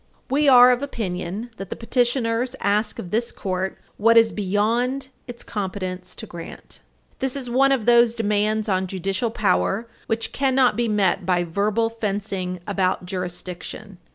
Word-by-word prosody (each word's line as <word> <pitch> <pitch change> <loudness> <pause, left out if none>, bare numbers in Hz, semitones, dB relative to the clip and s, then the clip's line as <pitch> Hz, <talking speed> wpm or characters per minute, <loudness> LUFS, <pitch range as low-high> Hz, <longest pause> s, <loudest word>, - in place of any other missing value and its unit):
S. - - -38
262. - - -3
We 285 - +6
are 250 -1 +9
of 250 +1 +1
opinion 210 -3 -4
that 195 -1 -7
the - - -4
appellants 240 0 0
ask 210 +2 0
of 175 - -7
this 235 +2 0
Court 190 0 -3 0.2
what 230 +2 +5
is 225 -1 +6
beyond 230 +7 0 0.2
its 240 -1 -8
competence 185 -3 -5
to - - -7
grant. 170 - -10 0.4
This 265 0 -2
is 255 -3 -5
one 270 +2 +4
of 255 -6 +1
those 235 -1 +5
demands 215 0 0
on 190 -2 0
judicial 195 +5 -2
power 215 +1 0 0.2
which 225 0 -1
cannot 260 -4 +2
be 240 +1 0
met 205 -4 +1
by 175 -1 +1
verbal 210 +6 0
fencing 195 -4 -3
about 190 -3 0
"jurisdiction." 180 +2 -6
215 Hz, 160 wpm, -23 LUFS, 190-235 Hz, 0.4 s, are